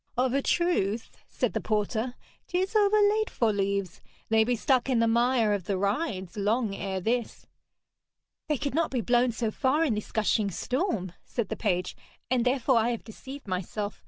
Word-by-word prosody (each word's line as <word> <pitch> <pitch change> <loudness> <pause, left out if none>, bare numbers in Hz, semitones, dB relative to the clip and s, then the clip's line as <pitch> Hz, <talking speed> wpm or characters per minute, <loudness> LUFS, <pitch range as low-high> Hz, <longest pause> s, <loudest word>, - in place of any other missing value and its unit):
'Of 255 0 +2
a 275 - +2
truth,' 235 - 0 0.2
said - - -1
the - - -1
porter, 220 +3 -1 0.3
''tis 375 +4 -1
overlate 425 +1 +4
for 225 -3 +1
leaves. 200 -2 -1 0.3
They 220 0 +5
be 245 +2 +1
stuck 260 +2 +1
in 255 - +2
the 230 0 +3
mire 235 -1 +3
of 195 -4 -2
the 195 0 -1
rides 200 - -2
long 210 +1 +1
ere 190 -1 -3
this.' 235 +5 -2 1.0
'They 300 -2 +1
could 280 +1 -3
not 325 +2 +1
be 255 -3 -1
blown 240 +3 +3
so 225 -1 -2
far 290 +7 +1
in 265 - +1
this 210 0 -5
gushing 215 -1 +1
storm,' 235 - -2
said 235 -5 -3
the - - -2
page, 180 -4 -1 0.4
'and 250 -2 +2
therefore 255 0 +2
I 225 +1 +3
have 235 -2 -3
deceived 265 +4 -10
myself. 195 +3 -3
230 Hz, 180 wpm, -28 LUFS, 205-265 Hz, 1.0 s, They